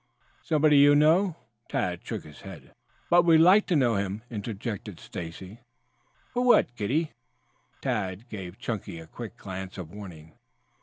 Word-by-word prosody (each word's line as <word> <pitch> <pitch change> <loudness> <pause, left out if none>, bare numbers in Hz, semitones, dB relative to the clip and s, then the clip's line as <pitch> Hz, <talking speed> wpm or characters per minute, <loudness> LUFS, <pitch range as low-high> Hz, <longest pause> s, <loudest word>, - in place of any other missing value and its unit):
"Somebody 155 -2 +3
you 145 +1 +7
know?" 160 +4 +4 0.3
Tad - - -2
shook - - -5
his 75 -1 -14
head. - - -11 0.4
"But 175 0 +7
we 165 -2 +6
would 160 - +6
like 195 +5 +6
to 180 - +1
know 120 -7 +3
him," 100 +2 -3
interjected 105 -1 -5
Stacy. 90 +5 -8 0.7
"For 245 - 0
what, 240 - +4
kiddie?" 140 +9 -1 0.7
Tad 105 -4 -2
gave 95 -3 -8
Chunky 105 -6 -5
a 80 - -10
quick 115 +7 -9
glance 95 -2 -7
of 85 -4 -7
warning. 85 -6 -10
110 Hz, 150 wpm, -27 LUFS, 95-150 Hz, 0.7 s, you